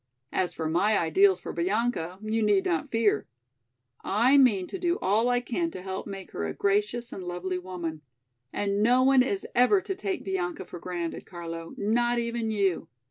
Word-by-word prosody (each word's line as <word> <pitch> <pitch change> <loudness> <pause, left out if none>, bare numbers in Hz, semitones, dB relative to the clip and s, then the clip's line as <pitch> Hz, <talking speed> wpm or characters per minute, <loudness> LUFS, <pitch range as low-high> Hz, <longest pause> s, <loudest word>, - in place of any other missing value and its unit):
As 175 -2 -1
for 160 - -2
my 200 +6 +2
ideals 185 +3 +4
for - - -7
Bianca, 185 -1 -1
you 220 +1 0
need 205 -2 +3
not 165 -2 -1
fear. 225 -9 +1 0.8
I 235 +7 +3
mean 235 -9 +5
to 385 - -6
do 350 0 +1
all 220 +5 +2
I 245 0 +2
can 330 +8 -2
to 185 - -8
help 190 0 -5
make 195 -2 -8
her - - -4
a 80 -1 -3
gracious 210 +4 0
and 190 - -6
lovely 180 +1 -3
woman. 175 -4 -5 0.5
And 200 0 -1
no 250 +4 +4
one 265 0 +6
is 200 -6 -1
ever 250 +11 +5
to 385 - -3
take 385 0 -3
Bianca 185 -2 -3
for 175 - -9
granted, 175 -1 -5
Carlo, 165 -2 -7
not 240 +3 +1
even 235 -1 -1
you. 195 -6 0
200 Hz, 185 wpm, -27 LUFS, 180-240 Hz, 0.8 s, one